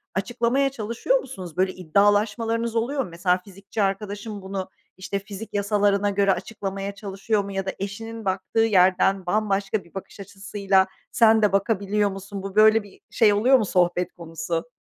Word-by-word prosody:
açıklamaya 240 +7 +1
çalışıyor 235 - 0
musunuz? 185 - -9
Böyle 185 0 +1
iddialaşmalarınız 210 +6 +1
oluyor 265 +5 0
mu? - - -9
Mesela 180 +2 +1
fizikçi 195 +3 -7
arkadaşın 205 +1 -3
bunu, 190 0 -5 0.3
işte, 195 +1 -3
fizik 200 +2 -9
yasalarına 205 0 +2
göre 200 0 +2
açıklamaya 195 -1 -5
çalışıyor 200 +1 -2
mu 200 - -7
ya 195 -1 -3
da 190 - -1
eşinin 225 +3 -6
baktığı 190 +3 -1
yerden 190 -2 +3
bambaşka 200 +1 0
bir 170 - -22
bakış 195 +1 -9
açısıyla 195 -1 0 0.2
sen 225 -1 +5
de 210 - +3
bakabiliyor 200 0 +1
musun? 195 0 -7
Bu 195 0 -6
böyle 215 +1 +6
bir 200 - -17
şey 215 -3 +4
oluyor 245 +6 +5
mu, 220 - 0
sohbet 180 -1 +1
konusu? 165 +3 -4
200 Hz, 160 wpm, -24 LUFS, 190-220 Hz, 0.3 s, böyle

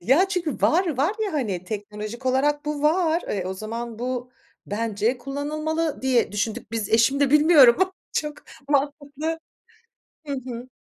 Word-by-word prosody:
Ya, 275 - +4
çünkü 350 -5 -2
var, 335 -3 +3
var 310 +10 +2
ya, 400 - -4
hani, 205 - -2
teknolojik 210 +4 -6
olarak 290 +3 +1
bu 300 -1 -3
var. 330 +2 +2
E, 190 -3 -2
o 190 - -3
zaman 225 +3 -6
bu 250 0 -3 0.4
bence 225 +3 -1
kullanılmalı, 305 +4 -3
diye 250 -6 +2
düşündük 210 +2 -3
biz 220 -3 -2
eşim 235 +5 +3
de 280 -2 +3
bilmiyorum 295 -5 +7 0.4
çok 300 -1 -2 0.3
mantıklı. 290 +2 -1 0.9
Hı 285 - -2
hı. 250 -2 -6
265 Hz, 145 wpm, -24 LUFS, 230-300 Hz, 0.9 s, bilmiyorum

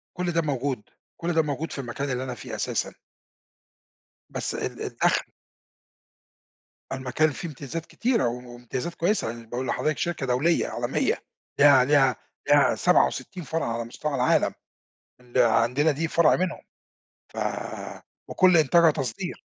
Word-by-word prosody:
كل 180 -1 -1
ده 165 0 +2
موجود، 135 -5 -2 0.4
كل 170 +1 -2
ده 160 - +4
موجود 150 +1 -3
في - - -6
المكان 135 +3 -4
اللي 125 0 -2
أنا 130 -1 -4
فيه - - -7
أساسًا. - - -2 1.4
بس - - -3
ال - - -4
ال - - -5
الدخْل. - - 0 1.6
المكان 135 +4 +1
فيه 170 - -6
امتيازات 155 +2 -6
كتيرة، 235 - 0
و 120 +1 -5
وامتيازات 125 +7 -5
كويسة، 190 - 0
يعني 115 0 -8
باقول 125 +3 -4
لحضرتِك 155 +5 0
شركة 170 -6 -2
دولية 135 +7 +2
عالمية، - - 0 0.4
ليها 140 -3 +7
ليها 135 -2 +4 0.3
ليها 145 -3 +5
67 180 0 +1
فرع 155 -5 -2
على 115 0 -2
مستوى 140 +5 -4
العالم، 125 -1 +2 0.7
اللي 125 0 +2
عندنا 120 +6 +3
دي 155 +3 -1
فرع 165 0 +4
منهم، 185 0 -2 0.7
ف - - -15 0.9
وكل 185 -2 +5
إنتاجها 160 +2 +5
تصدير. 135 +6 -4
145 Hz, 140 wpm, -25 LUFS, 125-165 Hz, 1.6 s, ليها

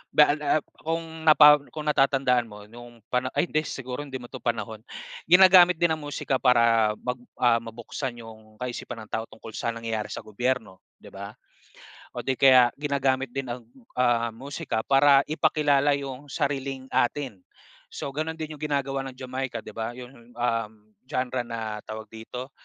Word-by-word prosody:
bale 150 0 +5
a 155 - +4
ap - - -51 0.2
kung 165 +1 -1 0.2
napa 150 -1 +9 0.3
kung 155 - -4
natatandaan 135 -4 +2
mo 105 -1 -12
no'ng 120 -1 -13
pana 125 0 +1
ay 175 - +2
hindi, 155 - +2
siguro 130 0 -5
hindi 135 - -9
mo 120 - -11
'to 130 - -7
panahon. 110 -2 -2 0.5
Ginagamit 180 -1 +8
din 170 -1 +2
ang 160 - -1
musika 145 -2 -2
para 115 -4 +4
mag 125 0 -4 0.2
ah, 120 -2 +4
mabuksan 120 +3 -6
'yong 110 -2 -13
kaisipan 120 -2 -5
ng - - -25
tao 110 0 -2
tungkol 110 0 -12
sa 115 - -2
nangyayari 115 -2 -3
sa - - -6
gobyerno, 115 -2 -2 0.2
'di - - -12
ba, 100 +2 -8 0.8
o - - -3
'di 130 -1 -1
kaya 130 -3 +7
ginagamit 135 -3 0
din 135 -2 -3
ang, 120 -1 -7 0.3
ah, 120 -2 +2
musika 130 -1 -4
para 140 0 +6
ipakilala 145 -2 +2
'yong 140 0 -7
sariling 135 -2 -2
atin. 120 -6 0 0.5
So 140 - -5
gano'n 160 +2 -3
din 155 -1 -5
'yong 150 - -11
ginagawa 140 -2 -1
ng - - -18
Jamaica, 130 -2 -4
'di 110 - -11
ba? 115 +1 -3
'Yong, 120 -1 -13
um, 115 -2 -1 0.3
genre 130 -2 -2
na, 110 -2 -5
tawag 110 0 -7
dito, 125 +4 -8
125 Hz, 170 wpm, -26 LUFS, 115-140 Hz, 0.8 s, napa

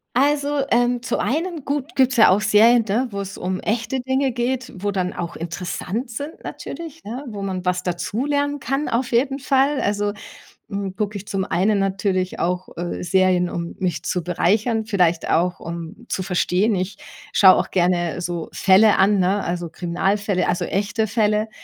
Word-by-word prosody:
Also, 285 +1 +2
ähm, 245 0 +2
zum 240 - -2
einen, 325 +2 -2
gut, 290 +4 -3
gibt's 260 -1 +3
ja 220 - +7
auch 195 +3 +3
Serien, 220 +2 +5
ne, 235 +6 +1
wo 200 -1 -4
's 195 - -8
um 185 +1 -3
echte 230 +4 -1
Dinge 265 +1 0
geht, 245 +1 -2
wo 205 +2 -2
dann 185 -2 -1
auch 170 -1 -5
interessant 180 +8 -4
sind 285 +7 -5
natürlich, 330 +1 -8
ne, 245 +7 -6
wo 205 -3 -6
man 190 -2 -4
was 180 0 +1
dazulernen 285 +11 -1
kann 275 +4 -2
auf 245 +2 -1
jeden 270 +3 +1
Fall. 275 +1 +2
Also, 205 0 0 0.5
hm, 200 -3 -4
gucke 210 0 -2
ich 200 +1 -10
zum 195 -2 -1
einen 200 +3 +1
natürlich 190 -1 -1
auch, 180 +2 -1
äh, 175 +1 -4
Serien, 180 0 +2
um 170 0 -5
mich 180 -4 -2
zu 180 -2 -2
bereichern, 215 +6 +1
vielleicht 175 -5 +1
auch, 175 +2 +1
um 170 +7 -8
zu 185 - -2
verstehen. 185 +4 +1
Ich 185 +2 -2 0.3
schaue 190 -2 +7
auch - - -1
gerne 175 -2 +1
so 175 -2 -4
Fälle 200 +2 +5
an, 200 +1 +4
ne, 190 +3 +1
also, 175 0 -3
Kriminalfälle, 190 +3 -1
also, 175 - 0
echte 210 +3 -1
Fälle 215 0 +1
205 Hz, 175 wpm, -21 LUFS, 180-245 Hz, 0.5 s, ja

